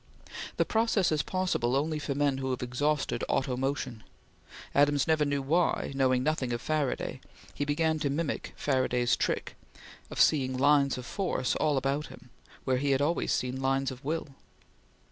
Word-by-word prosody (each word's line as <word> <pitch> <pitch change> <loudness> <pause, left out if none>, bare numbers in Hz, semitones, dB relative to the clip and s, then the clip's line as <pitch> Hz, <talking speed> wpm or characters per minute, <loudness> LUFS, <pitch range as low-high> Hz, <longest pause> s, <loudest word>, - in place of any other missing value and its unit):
The - - +3
process 220 -5 +2
is 155 -1 +2
possible 180 -10 0
only 155 +2 0
for 145 -1 -3
men 140 -2 +1
who 130 0 -2
have 125 -1 -2
exhausted 145 +4 -1
auto 130 -1 0
motion. 130 -3 -2 0.7
Adams 145 -1 +3
never 155 -2 +2
knew 145 -1 -1
why, 165 +3 +1
knowing 130 -2 +2
nothing 140 -4 0
of 120 - -2
Faraday, 150 +1 -2 0.3
he 145 - -2
began 160 +2 +1
to 145 -2 0
mimic 150 +2 -2
Faraday's 130 -3 +1
trick - - -2 0.5
of - - -6
seeing 130 -4 +3
lines 140 0 +4
of 125 - -7
force 180 -9 -1
all 150 -2 +1
about 135 +3 -1
him, 125 - -14 0.3
where 130 -1 +1
he 140 +2 0
had 135 0 +2
always 165 +3 0
seen 125 +1 -1
lines 135 0 +1
of 125 -1 -10
will. 155 +1 -2
140 Hz, 165 wpm, -29 LUFS, 130-150 Hz, 0.7 s, lines